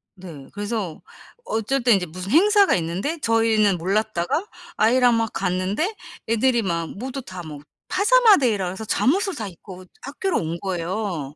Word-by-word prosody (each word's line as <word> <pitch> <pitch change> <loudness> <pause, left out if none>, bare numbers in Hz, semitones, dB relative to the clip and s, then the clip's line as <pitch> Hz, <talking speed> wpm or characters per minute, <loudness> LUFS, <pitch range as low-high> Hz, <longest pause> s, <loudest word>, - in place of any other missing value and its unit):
네. 165 -8 -11
그래서 205 -5 -4 0.4
어쩔 230 +4 -1
때는 235 -5 +5
이제 180 - -3
무슨 185 +5 -7
행사가 405 +5 +5
있는데 185 - -2
저희는 225 -5 +2
몰랐다가 210 - -1 0.3
아이랑 245 +2 +4
막 225 -1 -1
갔는데 195 - -1 0.3
애들이 235 +1 +2
막 170 -4 -2
모두 260 +4 -5
다 185 -7 -9
뭐 150 -2 -9 0.3
파자마 445 +2 +5
데이라 225 - +1
그래서 190 +4 -5
잠옷을 365 - +1
다 215 - -5
입고 185 +1 -12 0.2
학교로 315 +6 -2
온 165 +1 -4
거예요. 175 -4 -3
215 Hz, 330 characters per minute, -22 LUFS, 180-260 Hz, 0.4 s, 때는